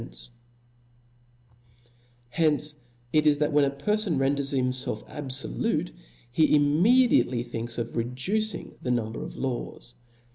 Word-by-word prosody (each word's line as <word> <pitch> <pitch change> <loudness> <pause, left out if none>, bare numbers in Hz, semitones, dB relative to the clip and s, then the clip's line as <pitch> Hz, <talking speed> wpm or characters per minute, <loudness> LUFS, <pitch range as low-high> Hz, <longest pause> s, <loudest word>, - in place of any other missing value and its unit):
Hence 150 0 +1 0.4
it 155 0 +4
is, 145 -1 +5
that 150 0 0
when 145 -1 +5
a - - +1
perfon 185 +5 -1
renders 140 +1 +1
himfelf 125 -4 -1
abfolute 130 - -2 0.2
*, 120 - -30
he 155 +3 +4
immediately 150 - +4
thinks 115 0 -5
of 115 -1 -4
reducing 165 - -2
the 125 - -4
number 115 -2 -1
of - - -7
laws. 120 -2 -4
140 Hz, 115 wpm, -27 LUFS, 120-155 Hz, 0.4 s, is